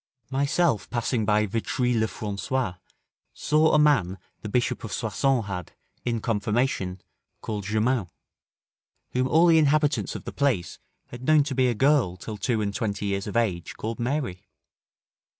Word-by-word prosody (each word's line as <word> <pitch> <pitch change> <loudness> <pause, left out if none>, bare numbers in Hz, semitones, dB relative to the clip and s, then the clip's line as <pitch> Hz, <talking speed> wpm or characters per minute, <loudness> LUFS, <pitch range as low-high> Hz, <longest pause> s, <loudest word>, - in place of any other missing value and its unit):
Myself 140 -1 +1
passing 120 -1 -1
by 105 0 +3
Vitry 120 +4 -1
le 110 -1 +2
Francois, 105 +3 -2 0.6
saw 155 +2 +2
a - - +6
man 135 -12 +3 0.2
the 105 - -6
Bishop 125 +2 0
of 110 - -6
Soissons 120 +2 0
had, 90 -4 -6 0.3
in 115 -2 -1
confirmation, 105 -3 -1 0.4
called 105 -3 -4
Germain, 110 +1 +1 1.0
whom 130 +1 +1
all 160 +5 +5
the 165 -2 +6
inhabitants 150 0 +2
of - - -6
the - - -7
place 125 - 0 0.3
had 120 - -9
known 155 0 +5
to 140 -1 -4
be 130 -1 +3
a 120 - 0
girl 130 -8 +3
till 105 +4 -7
two 110 +2 0
and 100 -1 -2
twenty 105 -1 -2
years 100 0 -2
of 105 - -2
age, 95 -8 -1
called 115 +2 -4
Mary. 120 -7 -2
115 Hz, 155 wpm, -26 LUFS, 105-135 Hz, 1.0 s, a